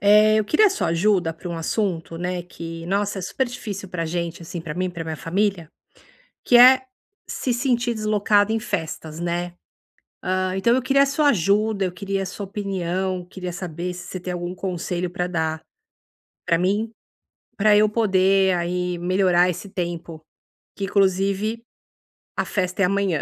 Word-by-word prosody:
Eh, 210 +2 +6
eu 215 - +1
queria 365 - +4
a - - +3
sua 390 - -1
ajuda 175 0 +2
pra 165 +2 -9
um 170 - -4
assunto 165 -1 -2
né 180 0 -2
que 165 -1 -8
nossa, 200 +1 0
é - - -7
super 260 +8 -1
difícil 205 -5 -6
pra 175 -2 -3
gente, 170 +1 -3
assim, 170 +1 -6
pra 160 -2 -6
mim 185 +1 -1
e - - -2
pra 170 -2 -6
minha 160 -1 -4
família, 180 +2 -1 0.8
que 245 - +5
é 255 +2 +8 0.5
se 255 - -2
sentir 240 -1 +1
deslocada 215 -1 +2
em 225 - +1
festas, 160 -6 -4
né. 175 0 -2 0.7
Ah, 185 0 0
então 235 +5 +3
eu 260 - +1
queria 275 +2 +4
a - - -2
sua 290 +1 +2
ajuda. 200 - +1
Eu 180 - -4
queria 195 +1 -3
a 190 - -4
sua 200 +1 -6
opinião. 190 -2 -2
Queria 180 -1 -6
saber 175 0 -4
se 175 -1 -9
você 185 - -5
tem 180 0 -4
algum 175 0 -4
conselho 180 -1 -3
pra 180 0 -2
dar 160 -2 -1 0.9
pra 170 - +3
mim, 205 +6 0 0.7
pra 210 +1 +4
eu 215 +1 +5
poder 195 -3 +3
aí 180 0 -2
melhorar 180 0 +3
esse 180 +3 -6
tempo 170 -3 -5 0.6
que, 200 - -3
inclusive, 195 +3 +1 0.8
a - - 0
festa 185 -1 -2
é - - +6
amanhã. 195 -4 +1
185 Hz, 175 wpm, -23 LUFS, 175-210 Hz, 0.9 s, é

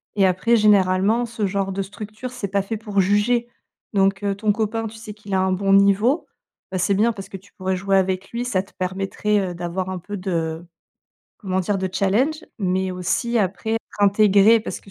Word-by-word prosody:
Et 195 - +4
après, 190 +6 +2
généralement, 205 +2 +3
ce 230 -3 -3
genre 195 0 -1
de 195 - -2
structures 215 +5 -7
c'est 245 -5 -4
pas 200 0 +1
fait 215 +3 -4
pour 205 -2 0
juger. 205 +5 +2 0.5
Donc, 195 0 +2
heu, 200 -1 +1
ton 210 +1 +1
copain, 225 +1 -2
tu 220 - -10
sais 220 -1 -9
qu'il 205 -1 -9
a 190 - +3
un 190 0 +1
bon 195 +1 +1
niveau, 200 - +3 0.4
bah, 185 - -2
c'est 190 +2 +1
bien 220 +4 +3
parce 195 -3 -8
que - - -10
tu 195 +2 -21
pourrais 185 0 -2
jouer 195 +1 +1
avec 190 0 0
lui, 240 +1 -3
ça 190 -6 0
te 195 - -21
permettrait, 195 +3 -1
heu, - - -5
d'avoir 175 +2 -3
un 185 -1 -4
peu 205 +4 -7
de, 165 -4 -3 0.8
comment 190 -3 -1
dire? 195 +2 -1
De 190 -1 -2
challenge. 225 +12 +1
Mais 190 -1 0
aussi 235 +7 -1
après 200 +2 -1
être 225 - 0 0.2
intégrée 205 +2 +5
parce - - -6
que 195 - -17
200 Hz, 210 wpm, -22 LUFS, 190-215 Hz, 0.8 s, intégrée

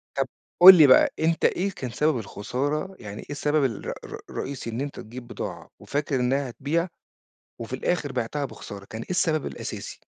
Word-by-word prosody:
طَب 135 -1 0 0.3
قُل 185 +2 +12
لي 155 -5 +8
بقى، 130 - +6
أنت 165 +1 +1
إيه 195 +2 +1
كان 130 -8 -6
سبب 150 +2 +1
الخسارة؟ 140 - -3
يعني 105 0 -8
إيه - - -12
السبب 150 +1 +1
الر 115 -5 -3
ر - - -7
رئيسي 130 -3 -5
إن 115 +3 -3
أنت 145 0 -5
تجيب 120 +2 -9
بضاعة - - -6
وفاكر 145 0 -2
إنها 130 +2 0
هتبيع 155 +8 -1 0.7
وفي 115 +2 -7
الآخر 150 +1 -1
بيعتها 130 +3 -2
بخسارة، 100 -6 -9
كان 110 +3 -7
إيه - - -10
السبب 160 -4 +1
الأساسي؟ - - -6
140 Hz, 180 wpm, -25 LUFS, 120-155 Hz, 0.7 s, قُل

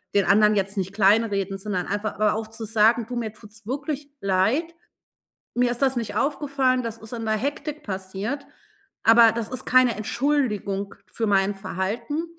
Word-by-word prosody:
den 200 - +4
anderen 210 0 +5
jetzt 200 +1 -1
nicht 190 0 -2
kleinreden, 200 -1 +2
sondern 190 -3 -3
einfach 210 +1 -2
aber 210 0 +2
auch 220 0 -4
zu 225 0 -7
sagen: 225 +2 +3
„Du, 245 - -5
mir 220 -3 -3
tut's 220 0 -15
wirklich 285 +2 -4
leid. 220 - +1 0.8
Mir 245 -1 +3
ist 245 - -5
das 265 -1 +3
nicht 230 -3 -3
aufgefallen. 275 -3 +1
Das 230 -1 -5
ist 220 +1 -11
in 230 -1 -4
der 220 0 +1
Hektik 290 +5 -4
passiert, 195 +7 -4 0.6
aber 230 0 +7
das 230 -2 -3
ist 255 0 -6
keine 255 -2 +4
Entschuldigung 215 -5 -1 0.2
für 225 - -2
mein 195 0 +2
Verhalten. 220 - -3
225 Hz, 170 wpm, -24 LUFS, 205-255 Hz, 0.8 s, aber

